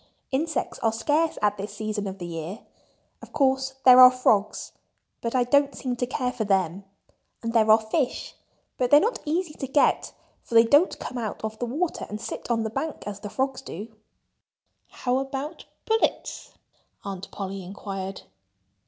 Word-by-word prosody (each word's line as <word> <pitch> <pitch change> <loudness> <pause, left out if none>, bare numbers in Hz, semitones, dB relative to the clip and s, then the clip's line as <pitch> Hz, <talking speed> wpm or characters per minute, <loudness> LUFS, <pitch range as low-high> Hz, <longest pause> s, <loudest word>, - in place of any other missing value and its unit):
"Insects 310 +4 -1
are 225 - +2
scarce 295 +8 +1
at 205 0 +2
this 200 +1 -6
season 210 -1 -3
of 190 0 -6
the 175 - -6
year. 170 +4 -6 0.6
Of - - -13
course, 265 -1 +1
there 255 -1 +9
are 255 0 +12
frogs—but 230 0 -2
I 250 - +4
don't 280 +3 +3
seem 250 -2 -3
to 245 - -1
care 250 0 -1
for 250 -3 -3
them. 190 -2 0 0.6
And 230 0 -2
there 220 -2 +4
are 215 - +9
fish—but 245 +1 -3
they're 290 - +8
not 450 +9 0
easy 325 +1 -1
to 270 - -5
get, 280 +2 +2 0.3
for 235 - -7
they 230 - +9
don't 290 +10 +4
come 250 - -5
out 220 -2 -5
of 220 0 -4
the 245 - -2
water 315 +8 -2
and 210 - -5
sit 230 - -6
on 230 -2 +1
the 220 - -3
bank, 315 +7 -4
as 205 -1 -5
the 205 0 -7
frogs 265 +3 -2
do." 220 -1 -8 0.9
"How 250 0 -1
about 270 +4 -5 0.2
pullets?" 445 0 -1 0.5
Aunt 195 -1 -6
Polly 195 -1 -5
inquired. 195 0 -6
235 Hz, 170 wpm, -25 LUFS, 205-270 Hz, 0.9 s, are